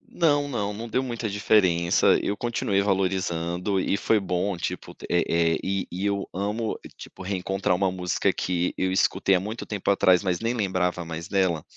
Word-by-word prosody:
Não, 145 -4 +3
não, 105 -6 -2
não 115 +3 -6
deu 130 - +1
muita 120 -3 -3
diferença, 95 -4 +3
eu 105 - -1
continuei 110 -4 0
valorizando 95 -1 0
e 100 - +1
foi 110 - +2
bom, 95 0 -1
tipo, - - -5 0.2
eh 85 - +3
eh, 85 -1 +2
e 95 -1 -1
e 95 +3 -3
eu 100 -1 -1
amo, 105 +4 -2 0.2
tipo, 95 - -10
reencontrar 95 0 -1
uma 95 +1 +1
música 90 -1 0
que 90 -1 -1
eu 95 0 0
escutei 95 +1 +2
há - - +2
muito 110 +5 -5
tempo 100 -2 -3
atrás, 95 -2 +4
mas 90 -2 0
nem 115 +2 -1
lembrava 95 -5 -1
mais 85 +1 -6
dela. 95 -5 +1
95 Hz, 180 wpm, -25 LUFS, 90-105 Hz, 0.2 s, atrás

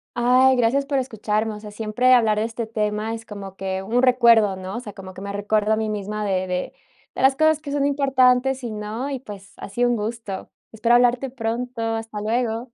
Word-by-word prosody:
Ay, 255 +2 +4
gracias 255 +4 +2
por 275 -1 0
escucharme, 220 -3 -2
o - - -9
sea, 210 -1 -10
siempre 225 +4 +2
hablar 220 -4 +4
de 215 - +1
este 230 0 -4
tema 215 0 -2
es 225 - -10
como 195 -3 -9
que 190 0 -3
un 235 +6 0
recuerdo, 235 -5 +5
¿no? 185 +1 -7
O - - -2
sea, 210 -5 -9
como 190 -1 -10
que 190 - -9
me 200 0 -5
recuerdo 210 +1 +1
a - - +3
mí 220 0 -2
misma 210 0 -3
de 185 -2 0
de 180 0 -3 0.4
de - - -3
las 265 0 +5
cosas 315 0 +3
que 285 -2 -7
son 285 -1 +1
importantes 265 -2 +2
y 235 - -4
no, 215 +6 -4
y, 270 - -3
pues, 200 -5 -11
ha - - -8
sido 240 +5 +1
un 240 - +2
gusto. 215 -2 -5 0.2
Espero 230 +2 +2
hablarte 245 +2 +3
pronto, 245 0 -4
hasta 225 -1 -3
luego. 230 +2 -1
225 Hz, 220 wpm, -22 LUFS, 210-250 Hz, 0.4 s, recuerdo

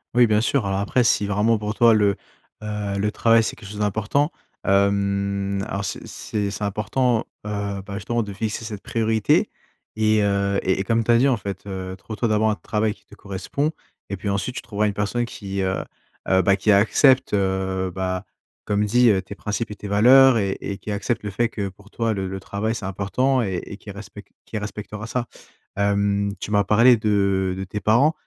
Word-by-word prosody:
Oui 120 -1 +6
bien 105 0 +3
sûr, 120 0 +1
alors 95 0 -1
après 120 +4 +1
si 105 - +3
vraiment 105 +3 +2
pour 105 0 -3
toi 115 +1 +5
le, 105 -2 +3 0.4
heu, 105 -2 -3
le 105 +1 0
travail 115 0 +4
c'est - - -3
quelque 100 - -11
chose 105 0 -7
d'important, 110 - +1 0.4
hem, 100 0 +1
alors 100 0 -3
c'est 90 - -5
c'est 105 -2 -3
c'est 105 +1 -3
important, 115 +4 0 0.3
heu, 100 -1 -3
bah, 100 - -8
justement 115 +4 -1
de 105 -2 -5
fixer 110 +2 -3
cette 105 -3 -6
priorité. 110 -2 +1 0.5
Et 110 0 +3
heu 100 -1 +1
et 95 +1 +1
et - - -1
comme 115 +2 +1
tu 120 - +3
as 115 - +6
dit 135 +4 +4
en 125 - +2
fait, 100 -2 -6
heu, 95 -1 -5
trouve 100 +3 -8
toi 120 - +1
d'abord 110 0 +2
un 105 - +1
travail 105 0 -1
qui - - -27
te - - -16
correspond, 100 +10 -3 0.4
et 100 - -3
puis 100 - -6
ensuite 100 +4 -1
tu - - -3
trouveras 105 -1 -1
une 100 - -1
personne 105 +4 -1
qui 100 -4 -5
heu 95 0 -1 0.5
heu, 95 0 +4
bah, 95 +2 +3
qui 105 +2 +2
accepte, 130 +6 +4
heu, 95 -1 0
bah, 95 +1 -2 0.4
comme 105 0 +1
dit 120 +3 +4
heu, 95 -2 +1
tes 100 +1 -10
principes 105 +1 -3
et - - -6
tes 105 - -8
valeurs 125 +5 +6
et 100 -2 -1
et 100 - -5
qui 105 - -6
accepte 105 +3 -2
le 105 - -3
fait 120 +5 +1
que 100 -3 -4
pour 100 +2 -19
toi 115 0 -1
le 95 -3 -2
le 95 +1 -5
travail 110 +4 -2
c'est 110 - -5
important 115 +8 0
et 95 -6 -2
et 100 - -9
qui 105 - -13
respecte 100 0 -11
qui 110 - -6
respectera 105 0 -6
ça. 120 +1 -2 0.5
Hem, 100 0 +1
tu - - -5
m'as 100 -1 +3
parlé 115 +5 +6
de 100 -3 +1
de 95 - -3
tes 105 +2 -5
parents, 120 +10 +4
105 Hz, 215 wpm, -23 LUFS, 100-110 Hz, 0.5 s, Oui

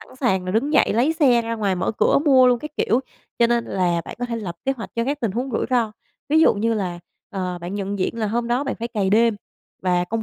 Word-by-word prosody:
sẵn 260 - -15
sàng 190 -9 0
là 185 - -3
đứng 260 +8 0
dậy, - - +4
lấy 250 +8 +2
xe 260 -7 +3
ra 230 0 -3
ngoài 200 -4 0
mở 180 - -1
cửa - - +4
mua 260 -3 +6
luôn 245 -1 +3
các 300 +5 -7
kiểu. 235 +4 +2 0.4
Cho 235 - +5
nên 235 0 +1
là 175 -3 0
bạn - - -8
có 245 - -2
thể 235 -1 -3
lập 185 -6 -5
kế 270 - +1
hoạch 230 - -7
cho 230 0 0
các 285 +2 -2
tình 225 -4 0
huống 250 +6 -3
rủi 225 - -1
ro, 235 -4 +1 0.4
ví 310 +2 +4
dụ 320 - +5
như 225 +2 0
là, 180 -4 -3 0.3
ờ, 185 -3 -3
bạn 175 +3 -5
nhận 200 0 -3
diện 230 +5 -2
là 220 - 0
hôm 235 +3 -1
đó 250 +4 0
bạn 275 - -2
phải 230 +1 -5
cày 205 -5 -1
đêm, 225 0 +3 0.5
và 180 -1 +1
công 225 +5 -3
230 Hz, 275 wpm, -22 LUFS, 195-245 Hz, 0.5 s, mua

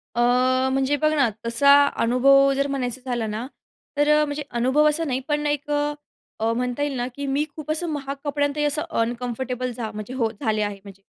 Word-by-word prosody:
अ, 240 - +1 0.5
म्हणजे 270 +2 +1
बघ 305 0 +3
ना 275 -6 +3 0.2
तसा 235 +5 +4 0.3
अनुभव 275 +4 +5
जर 275 +1 0
म्हणायचं 260 -3 -2
झाला 240 -3 -2
ना 215 +3 -4 0.5
तर 290 +1 +3
अ, - - +3
म्हणजे 295 0 -4 0.2
अनुभव 265 +5 +3
असा 310 +2 -1
नाही 260 -5 -1
पण 295 -1 -1
एक 290 0 -2
अ, 295 0 0 0.5
अ, 225 +1 +1
म्हणता 250 +3 -2
येईल 290 -2 -2
ना 245 0 -1
की 285 - -4
मी 275 +2 +1
खूप 310 -1 -5
असं 325 +3 -2
महाग 280 -2 -4
कपड्यांतही 290 0 -1
असं 295 +1 0 0.2
अनकम्फर्टेबल 250 +2 -3
जा 225 -2 -4
म्हणजे 215 +3 -7
हो 235 -4 0
झाले 220 -1 -1
आहे 205 -1 -3
म्हणजे. 195 -1 -13
270 Hz, 200 wpm, -23 LUFS, 240-290 Hz, 0.5 s, अनुभव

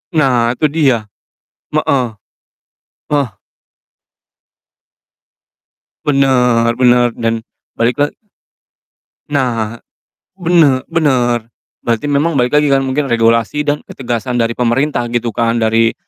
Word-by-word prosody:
Nah, 125 -5 +2
itu 155 - 0
dia. 145 -6 +3 0.8
Heeh. 130 -3 +1 1.0
Heeh. 145 -3 +1 2.8
Bener 125 -5 +3
bener 125 -1 +4
dan 115 -1 -1 0.4
balik 115 +1 +1
la 145 0 +2 1.2
Nah, 120 -6 -1 0.6
bene 165 -7 +3
bener, 125 -8 +1 0.4
berarti 115 +5 -1
memang 145 +4 +1
balik 125 +1 +2
lagi 150 - +3
kan, 135 -1 +3
mungkin 135 +2 -1
regulasi 115 +2 +1
dan 150 0 -2
ketegasan 120 -1 -3
dari 115 0 -1
pemerintah 125 +2 0
gitu 120 -1 0
kan, 115 +1 0
dari 115 +1 +2
125 Hz, 100 wpm, -15 LUFS, 115-145 Hz, 2.8 s, bener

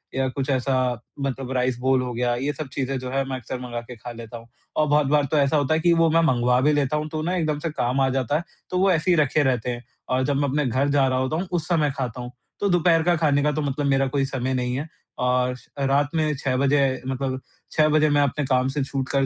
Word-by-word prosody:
या 135 0 +1
कुछ 135 +1 -4
ऐसा 130 0 +1 0.4
मतलब 135 -1 -3
राइस 125 -1 0
बोल 130 0 +2
हो 125 -1 -4
गया, 120 +1 0
ये 135 +4 -2
सब 150 +1 -6
चीज़ें 135 0 -2
जो 125 0 -6
है 135 +1 +1
मैं 130 - -2
अक्सर 125 +1 -6
मँगा 120 -1 -5
के 120 +1 -11
खा 120 +2 -8
लेता 115 0 -9
हूँ। 115 0 -14 0.3
और 155 - +3
बहुत 150 -1 +3
बार 145 0 +3
तो 155 - +2
ऐसा 145 +2 +3
होता 145 +1 +1
है 160 - +2
कि 170 +1 +4
वो 165 0 +4
मैं 165 +1 +4
मँगवा 125 +1 +2
भी 150 +3 +3
लेता 145 0 +1
हूँ 150 0 -3
तो 155 0 -3
ना 180 +3 -1
एकदम 155 -4 -1
से 165 - -3
काम 130 -2 0
आ 135 - +3
जाता 130 +1 0
है, 165 - -4 0.3
तो 180 - -1
वो 190 +1 +4
ऐसे 170 +1 +2
ही - - +5
रखे 150 0 +3
रहते 125 -3 0
हैं 120 0 -6 0.3
और 130 +1 +1
जब 145 0 0
मैं 145 0 +1
अपने 145 +2 0
घर 130 +3 +1
जा 140 -1 +3
रहा 130 0 +1
होता 130 +4 -1
हूँ 180 +4 -2
उस 170 -2 -1
समय 155 -5 +2
खाता 125 -2 -3
हूँ। 120 0 -7 0.3
तो 200 - +1
दोपहर 175 -2 +3
का 175 +1 +3
खाने 145 -3 +2
का 150 - +2
तो 155 - -2
मतलब 145 0 -2
मेरा 135 -1 +2
कोई 135 +1 0
समय 130 -1 -2
नहीं 125 -1 -1
है 150 +4 -4 0.3
और 125 0 +1 0.3
रात 140 +1 +2
में 155 -1 +1
6 130 -1 -1
बजे 140 +2 +3 0.3
मतलब 130 0 -2 0.3
6 155 -1 +3
बजे 155 0 +3
मैं 145 0 +3
अपने 145 +1 0
काम 130 -1 +2
से 145 - 0
छूटकर 135 0 -1
135 Hz, 270 wpm, -23 LUFS, 130-150 Hz, 0.4 s, ही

